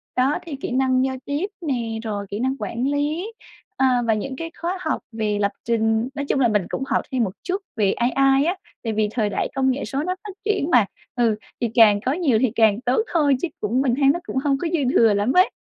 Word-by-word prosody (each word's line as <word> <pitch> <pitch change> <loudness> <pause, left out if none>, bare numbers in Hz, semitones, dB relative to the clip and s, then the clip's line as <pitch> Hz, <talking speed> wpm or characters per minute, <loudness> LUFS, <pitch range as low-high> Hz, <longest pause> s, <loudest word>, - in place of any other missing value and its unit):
Đó, 260 +3 +2
thì 325 -5 -6
kỹ 270 - -5
năng 260 0 +2
giao 265 0 -2
tiếp 290 +6 -1 0.2
nè, 235 -8 -2
rồi 205 -3 -3
kỹ 205 - -4
năng 260 +2 0
quản 235 +4 -2
lý, 300 +9 -1 0.4
à, 255 -2 +3
và 225 - +4
những 260 +5 -3
cái 330 +4 -6
khóa 350 +3 -1
học 315 - -1
về 215 -2 -1
lập 200 0 +2
trình. 225 +1 +1
Nói 285 -1 -3
chung 280 - 0
là 250 - +4
mình 210 -3 +1
cũng - - -3
học - - +1
thêm 255 -2 +1
một 205 - 0
chút 380 +2 -2
về 205 -4 +2
AI 270 +3 +3
á, 350 +3 +1 0.3
tại 225 -2 -2
vì 215 0 +1
thời 215 -3 0
đại 205 - -1
công 265 -1 +2
nghệ 265 +2 -3
số 275 +1 -2
nó 365 +2 -1
phát 400 - -7
triển 410 -7 0
mà. 240 -5 +6 0.3
Ừ, 235 -3 +2 0.3
thì 235 - +1
càng 210 -3 +6
có 260 - +2
nhiều 290 -9 +2
thì 255 -4 +2
càng 220 -1 +3
tốt 255 - +2
thôi 295 -5 +4
chứ 350 - 0
cũng 230 +5 +1
mình 255 -3 +2
thấy 275 0 +3
nó 345 - -3
cũng - - -6
hông 275 -1 +2
có 335 - -2
dư 335 - +2 0.2
thừa 225 -2 +5
lắm 205 +5 +1
ấy. 370 +1 +5
255 Hz, 250 wpm, -22 LUFS, 225-285 Hz, 0.4 s, mà